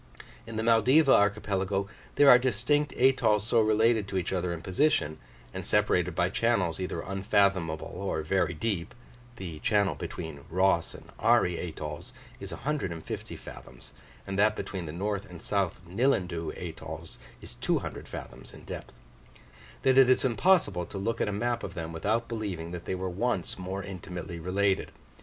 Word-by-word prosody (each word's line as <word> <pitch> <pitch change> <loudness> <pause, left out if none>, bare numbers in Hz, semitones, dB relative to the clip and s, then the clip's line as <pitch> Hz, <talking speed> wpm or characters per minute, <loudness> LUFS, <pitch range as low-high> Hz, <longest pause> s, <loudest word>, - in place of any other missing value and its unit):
In 115 - -7
the 110 - -1
Maldiva 130 +6 +5
archipelago 100 -1 +1 0.3
there 145 - +6
are 125 -2 +10
distinct 130 +5 +1
atolls 125 -5 +3
so 115 0 +3
related 110 0 +3
to 95 - -3
each 90 +1 -1
other 90 -1 -1
in 85 0 -5
position, 90 - +1 0.3
and - - -5
separated - - +2
by - - +2
channels 100 -8 +1
either 95 - -3
unfathomable 95 -4 +1
or 95 -5 -2
very 90 +1 +1
deep 95 0 -2 0.4
(the 85 -7 -7
channel 105 -3 +2
between 80 -3 -6
Ross 90 0 +2
and - - -13
Ari 90 -1 +3
atolls 75 -3 -6 0.3
is - - -7
150 95 - -4
fathoms, 60 -1 -12 0.3
and 100 0 -3
that 105 +1 +4
between 95 -4 -5
the - - -4
north 100 +3 -3
and 90 -2 -10
south 100 -3 -1
Nillandoo 90 - 0
atolls 80 -1 -7 0.2
is - - -8
200 - - -2
fathoms - - -9
in - - -13
depth), - - -8 0.9
that 130 0 +5
it 130 -1 +7
is 130 - +4
impossible 120 - +3
to - - -7
look 115 +4 -2
at - - +1
a - - -1
map 120 +4 -1
of 95 - -6
them 80 -2 -5
without 110 +8 0
believing 100 -8 -4
that 90 -1 -7
they - - -2
were 95 0 -3
once 95 0 -2
more 95 +2 -4
intimately 90 -2 -7
related. 95 +3 0
95 Hz, 160 wpm, -29 LUFS, 85-115 Hz, 0.9 s, are